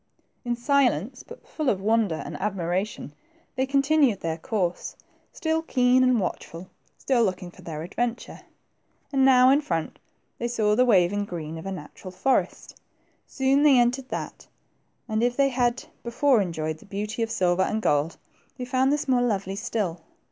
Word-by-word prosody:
In 240 -1 -1
silence, 250 - +1
but 475 - -14
full 305 -4 -2
of 195 - 0
wonder 215 -3 +1
and - - -7
admiration, 190 -4 -3 0.4
they 260 0 0
continued 275 -4 +2
their 165 0 -3
course, 180 -2 -2 0.4
still 320 0 -1
keen 255 -4 +3
and 255 -2 +3
watchful, 180 -1 -5 0.3
still 250 -3 +1
looking 185 -3 -2
for - - -16
their 155 -2 -6
adventure. 235 +7 -4 0.7
And 270 -1 +3
now, 255 -1 +6
in 285 +2 +4
front, 165 - -3 0.4
they 235 - -1
saw 215 -3 +1
the 250 +3 +4
waving 205 -2 +3
green 165 -4 -6
of 165 - -8
a - - -3
natural 185 +1 -9
forest. 185 +9 -1 0.5
Soon 270 +1 +1
they 290 -3 +6
entered 245 +2 +2
upon - - -4
thaf, - - -18 0.6
and 220 -1 -1
if 245 +1 0
they 275 -1 +4
had 245 -1 0 0.2
before 240 0 +2
enjoyed 160 -4 -3
the - - -17
beauty 210 +3 -4
of 225 - 0
the 230 - -3
silver 180 -1 +2
and 215 - 0
gold, 150 -5 0 0.4
they 250 - -5
found 260 +1 +1
this 295 0 -1
more 255 -2 +3
lovely 195 -5 -1
still. 195 -5 -3
225 Hz, 170 wpm, -25 LUFS, 185-255 Hz, 0.7 s, now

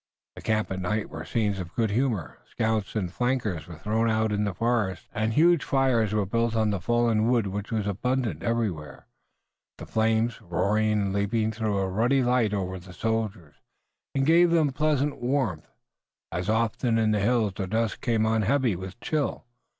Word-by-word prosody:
The - - -9
camps 110 -2 0
at 95 - -2
night 105 +4 -2
were - - -6
scenes 105 -4 -1
of 85 -1 -7
good 115 -3 +1
humor. 115 - -1
Scouts 110 -2 -1
and 90 -5 -2
flankers 115 - -1
were 85 -2 -9
thrown 110 +7 0
out 110 0 +1
in 105 0 0
the 100 - -2
forest, 110 -6 -1
and 110 +1 0
huge 170 +3 +4
fires 130 -6 +2
were 105 -2 +1
built 115 +3 0
of 110 -1 +2
the 100 - -1
fallen 115 +1 +2
wood 120 -4 +2
which 100 +1 -4
was 110 -3 -1
abundant 110 - -1
everywhere. 110 -10 -2 0.7
The - - -8
flames, 110 +1 0
roaring 105 +5 +1
and 100 -2 0
leaping, 110 +2 0
threw 110 -2 -1
a 95 -1 0
ruddy 120 +8 +2
light 120 -3 +2
over 95 -2 -3
the 90 +1 -13
soldiers, 105 -6 -3 0.6
and 135 0 +2
gave 170 +3 +5
them 160 -4 +3
pleasant 145 0 0
warmth, 120 - -1 0.6
as 90 +3 -3
often 115 +1 +1
in 110 -1 +2
the 105 - +2
hills 110 -1 +1
the 95 - -3
dusk 110 +3 -1
came 115 -2 +1
on 110 0 +2
heavy 125 -1 +2
with 95 +4 -8
chill. 150 -5 -2
110 Hz, 180 wpm, -26 LUFS, 100-120 Hz, 0.7 s, gave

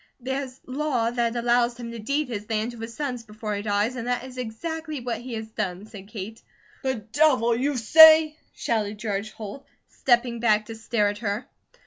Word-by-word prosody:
"There's 265 +1 -4
law 255 -4 0
that 240 -1 0
allows 240 0 +2
him 235 -1 -6
to 235 - -7
deed 280 +6 -1
his 210 -3 -6
land 220 +1 -1
to 235 - -11
his 225 +1 -7
sons 260 -5 -3
before 215 -1 -5
he 205 - -2
dies, 210 +3 0
and 240 -1 -5
that 245 0 0
is 255 -1 -9
exactly 310 +6 -4
what 240 -1 -4
he 245 -1 -6
has 220 0 -4
done," 195 -3 -4
said 205 -3 -11
Kate. 215 +1 -7 0.4
"The 265 -1 0
Devil, 235 +1 +2
you 270 +3 0
say!" 315 +5 +8 0.2
shouted 215 -2 -2
George 205 -1 -3
Holt, 215 +6 -8 0.3
stepping 240 -2 +1
back 215 -2 +3
to 225 - -8
stare 220 -2 +1
at 205 0 -5
her. 210 +1 -2
235 Hz, 190 wpm, -25 LUFS, 215-255 Hz, 0.4 s, say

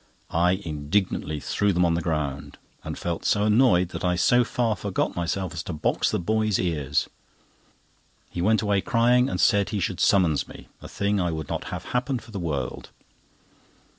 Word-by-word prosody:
I 90 +2 +3
indignantly 80 -2 -2
threw 100 +7 0
them 90 0 +3
on 85 - +2
the 85 - 0
ground, 75 -3 -3 0.3
and - - -5
felt 85 -1 -3
so 105 - +2
annoyed 105 -5 +4
that - - -6
I 90 -1 +2
so 120 +8 +4
far 115 -2 0
forgot 100 -3 -2
myself 90 +1 -2
as 80 - -4
to 90 - -6
box 75 - 0
the - - 0
boy's 110 +2 +1
ears. 75 -6 0 1.2
He 85 - -5
went 110 +3 +2
away 100 -2 +1
crying, 125 +3 +3
and 90 - -3
said 100 +3 +3
he 105 - -2
should - - -2
summons 85 -7 +3
me, - - -13
a - - -9
thing 100 0 -1
I 90 - 0
would 80 -3 -5
not - - -3
have - - -6
happen 125 +2 0
for 115 - -12
the 100 - -5
world. 75 -6 -4
90 Hz, 185 wpm, -25 LUFS, 80-105 Hz, 1.2 s, annoyed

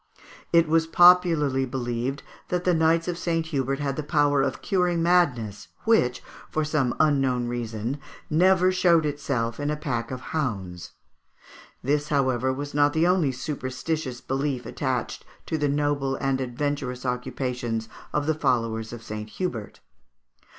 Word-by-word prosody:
It 170 -1 +5
was 160 +1 +2
popularly 165 -6 +5
believed 125 +1 -3 0.2
that 180 0 -1
the 180 - +3
Knights 165 +1 +2
of 175 -1 -2
St. 165 -2 0
Hubert 135 -4 -1
had 140 -2 -2
the - - -1
power 145 -2 +2
of 135 -1 -2
curing 180 -3 +1
madness, 125 - +1 0.2
which, 220 - +2 0.3
for 155 0 -1
some 150 -5 0
unknown 135 -5 +2
reason, 120 +2 -3 0.3
never 185 +3 +4
showed 175 -3 +3
itself 140 -6 -2
in 145 0 -1
a 150 - 0
pack 125 -7 -3
of 130 - -5
hounds. 95 - -3 0.9
This, 145 +2 0
however, 130 -3 +1
was 145 +2 -5
not 145 0 +3
the 160 +1 +2
only 175 -6 +3
superstitious 130 0 -4
belief 135 -1 -2
attached 130 -4 -3 0.2
to - - -2
the 150 -2 +1
noble 145 -1 0
and 135 -1 -1
adventurous 130 0 -3
occupations 125 -2 -2 0.2
of 150 -1 0
the 160 - +2
followers 115 -6 0
of 120 -1 -8
St. 105 -1 -6
Hubert. 115 - -5
140 Hz, 145 wpm, -25 LUFS, 125-160 Hz, 0.9 s, It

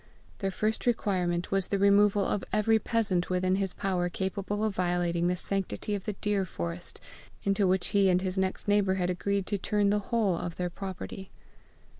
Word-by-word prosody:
Their 195 - 0
first 215 +5 -1
requirement 180 -7 0
was 195 -1 +2
the 200 - 0
removal 200 0 +4
of 205 - -1
every 220 +1 +3
peasant 210 -7 0
within 185 +1 +1
his 195 -2 -1
power 180 -2 -1
capable 195 +3 -3
of 215 -2 0
violating 175 -1 0
the 180 - +1
sanctity 195 +2 -3
of 200 -2 -3
the 210 - -2
deer 205 0 0
forest 85 - -3 0.4
into 195 0 +2
which 185 0 +1
he 200 -1 +4
and 180 0 +4
his 185 0 -2
next 190 +1 -1
neighbour 205 -2 +3
had 180 -1 0
agreed 200 +2 -1
to 205 0 -2
turn 205 +1 +1
the 210 - +2
whole 220 -6 +2
of 170 0 -4
their 180 -1 -2
property. 190 +1 -7
195 Hz, 185 wpm, -29 LUFS, 180-205 Hz, 0.4 s, removal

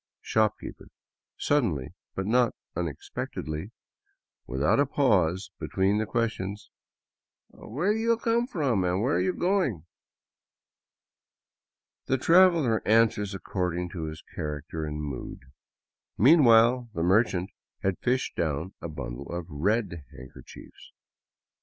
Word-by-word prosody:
Shopkeeper, 110 -1 -1 0.5
suddenly, 95 - 0 0.2
but 95 - -2
not 120 +2 +2 0.2
unexpectedly, 80 0 -5 0.8
without 70 - +1
a 145 - +3
pause 95 - +1
be - - -4
tween 100 +2 +1
the 110 - -1
questions: 105 -3 -3 0.4
" - - -66
Where 170 - -2
do 220 - -2
you 230 +1 +2
come 235 +1 +1
from 140 - 0
where 95 +10 +1
are - - +1
you 185 - +1
go 190 +2 +1
ing?" 90 - -4 2.2
The 130 - +1
traveler 165 -6 +4
answers 105 -2 +2
according 90 -2 -3
to 85 -3 -5
his 80 0 -7
character 75 +1 -4
and 75 0 -5
mood. 70 -4 -6 0.8
Mean 145 +6 +6
while 120 +1 +5
the 85 - -1
merchant 95 -1 +2 0.3
had 95 -2 0
fished 130 +1 -1
down 80 +3 -2
a 85 - -5
bundle 70 -3 -7
of 85 -1 -4
red 85 0 -1
handkerchiefs. 65 0 -13
100 Hz, 120 wpm, -27 LUFS, 85-125 Hz, 2.2 s, Mean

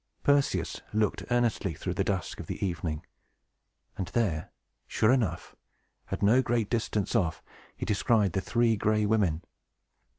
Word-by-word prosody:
Perseus 140 -1 +1
looked 110 -1 +1
earnestly 120 -8 +1
through 90 +3 -3
the 95 - 0
dusk 95 -5 -2
of - - -7
the - - -3
evening, 80 -4 -3 0.9
and 95 - -3
there, 95 -10 -1 0.4
sure 110 - +3
enough, 125 -6 -1 0.5
at - - -3
no 115 +6 +5
great 120 -4 0
distance 110 -2 -1
off, 90 -8 0 0.3
he - - -3
descried 105 -2 +2
the 95 - 0
Three 115 +2 +2
Gray 105 +1 +1
Women. 100 -7 +1
105 Hz, 140 wpm, -29 LUFS, 95-115 Hz, 0.9 s, no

